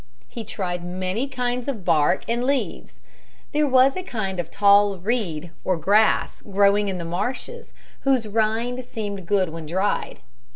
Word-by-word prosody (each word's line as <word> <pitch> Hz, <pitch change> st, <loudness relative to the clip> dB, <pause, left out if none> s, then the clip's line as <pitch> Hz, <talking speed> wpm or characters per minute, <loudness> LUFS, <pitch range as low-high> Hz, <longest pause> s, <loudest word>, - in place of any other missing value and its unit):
He 230 Hz, -, -7 dB
tried 180 Hz, -4 st, -4 dB
many 185 Hz, +7 st, -2 dB
kinds 250 Hz, -1 st, -2 dB
of 225 Hz, -10 st, -4 dB
bark 165 Hz, +1 st, +3 dB
and 235 Hz, +1 st, 0 dB
leaves. 275 Hz, +1 st, -2 dB, 0.5 s
There 300 Hz, 0 st, +2 dB
was 260 Hz, 0 st, +5 dB
a 370 Hz, -, -2 dB
kind 205 Hz, -, -4 dB
of 170 Hz, -2 st, -3 dB
tall 200 Hz, +1 st, +4 dB
reed 180 Hz, -5 st, -2 dB
or 185 Hz, -2 st, +1 dB
grass 205 Hz, +7 st, +2 dB
growing 200 Hz, 0 st, +3 dB
in 190 Hz, -2 st, -2 dB
the 170 Hz, -, -5 dB
marshes 250 Hz, -, -4 dB, 0.3 s
whose 260 Hz, -5 st, +1 dB
rind 225 Hz, +4 st, 0 dB
seemed 205 Hz, -6 st, -6 dB
good 190 Hz, -3 st, +2 dB
when 160 Hz, -1 st, -7 dB
dried. 190 Hz, +5 st, -1 dB
205 Hz, 155 wpm, -23 LUFS, 185-245 Hz, 0.5 s, was